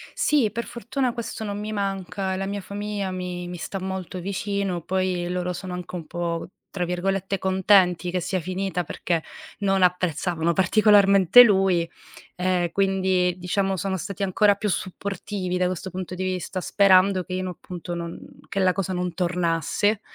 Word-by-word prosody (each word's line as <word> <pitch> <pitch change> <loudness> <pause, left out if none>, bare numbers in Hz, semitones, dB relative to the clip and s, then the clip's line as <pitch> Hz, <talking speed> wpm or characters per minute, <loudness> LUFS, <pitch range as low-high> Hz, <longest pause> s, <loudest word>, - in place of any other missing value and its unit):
Sì, 280 -8 +3
per 235 +2 -4
fortuna 245 +1 -2
questo 230 -1 -5
non 205 -1 -4
mi 210 +1 -4
manca. 195 -1 -2
La 195 - -2
mia 200 0 -3
famiglia 200 0 -4
mi 180 -1 -4
mi 175 0 -6
sta 195 +3 -5
molto 190 -1 -5
vicino, 195 -1 -2
poi 185 0 -1
loro 180 0 -2
sono 180 0 -6
anche 180 0 -6
un 170 -3 -5
po', 170 -1 -3 0.2
tra 180 -2 -2
virgolette, 195 +2 -1
"contenti" 185 -2 +3
che 180 - 0
sia 185 +2 -1
finita 185 +1 -2
perché 170 -1 -2 0.4
non 195 -2 +1
apprezzavano 175 -1 +1
particolarmente 200 +2 +6
lui, 190 -5 +3 0.5
ehm, 180 -1 0
quindi, 190 -2 +1
diciamo 195 +2 0
sono 190 +2 -2
stati 195 +2 -4
ancora 200 +2 +3
più 210 +1 -2
supportivi 190 0 -3
da 180 - +2
questo 185 +1 -4
punto 185 -1 -6
di 185 - -3
vista, 185 0 -3
sperando 190 -1 +4
che 185 - -7
io 185 0 -1
n - - -3
appunto 175 -1 -7
non 170 0 -5 0.3
che 195 - -3
la 185 -1 +4
cosa 190 -1 -2
non 180 -1 -2
tornasse, 180 +4 0
185 Hz, 165 wpm, -24 LUFS, 180-195 Hz, 0.5 s, particolarmente